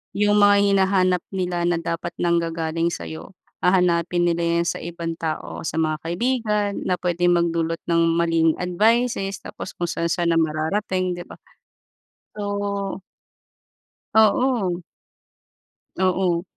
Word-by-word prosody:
Yung 205 0 +3
mga 205 0 +6
hinahanap 190 -2 +3 0.2
nila 175 -2 -1
na 175 - +2
dapat 165 0 -4
nanggagaling 165 -1 0
sa'yo 85 - -6 0.3
hahanapin 175 -1 +2
nila 170 0 +1 0.2
yan 170 - +1
sa - - -2
ibang 170 -1 -4
tao, 160 -1 -4
sa 160 - -4
mga 155 -1 0
kaibigan 210 +3 0
na 180 - 0
puwedeng 175 0 +1
magdulot 165 -1 0
ng 170 -1 +2 0.2
maling 165 -1 +2
advices, 200 +2 +1
tapos - - -8
kung 175 - -1
saan-saan 170 0 0
na 165 - +3
mararating 180 +4 -1
'di 175 - -6
ba. - - -9 1.0
So 200 -1 -3 1.2
Oo. 220 -4 +3 1.1
Oo. 185 -2 +1
175 Hz, 120 wpm, -22 LUFS, 170-195 Hz, 1.2 s, mga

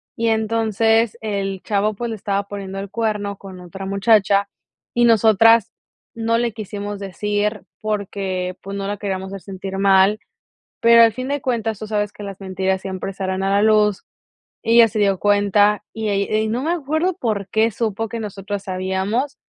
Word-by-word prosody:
y 230 0 -1
entonces 225 0 +1
el 195 -3 -3
chavo, 210 0 0
pues, 235 +2 -4
le - - -3
estaba 200 0 -2
poniendo 195 -1 -6
el 200 0 -6
cuerno 210 -2 -2
con 190 -2 -11
otra 185 +2 -8
muchacha 200 0 +3 0.5
y 240 - +2
nosotras 225 0 +5 0.4
no 230 0 0
le 235 -2 -1
quisimos 205 -1 -6
decir 205 +1 -2 0.2
porque, 195 -3 -3
pues, 200 +1 -6
no 195 0 -3
la 205 - -2
queríamos 190 -2 -3
hacer 195 - -7
sentir 195 +1 -6
mal, 195 +1 +4 0.6
pero 230 0 +7
al 225 -1 +6
fin 255 +1 -4
de 285 0 -1
cuentas 225 -5 -2
tú 215 - -6
sabes 205 -1 -1
que 210 - -11
las 195 -1 -7
mentiras 190 0 -1
siempre 190 0 -5
salen 190 -1 -3
a 195 - 0
la 200 +1 +3
luz. 210 -2 +3 0.6
Ella 230 0 +6
se 215 - -4
dio 195 -2 +2
cuenta 205 0 +3
y 220 -1 -3
ell 200 0 0
y 220 0 0
no 240 +4 -1
me 330 +3 0
acuerdo 320 +3 -1
por 205 -5 -2
qué 220 +3 +2
supo 225 0 -2
que 230 - -4
nosotras 200 -1 -5
sabíamos. 190 +8 -2
205 Hz, 180 wpm, -20 LUFS, 195-225 Hz, 0.6 s, pero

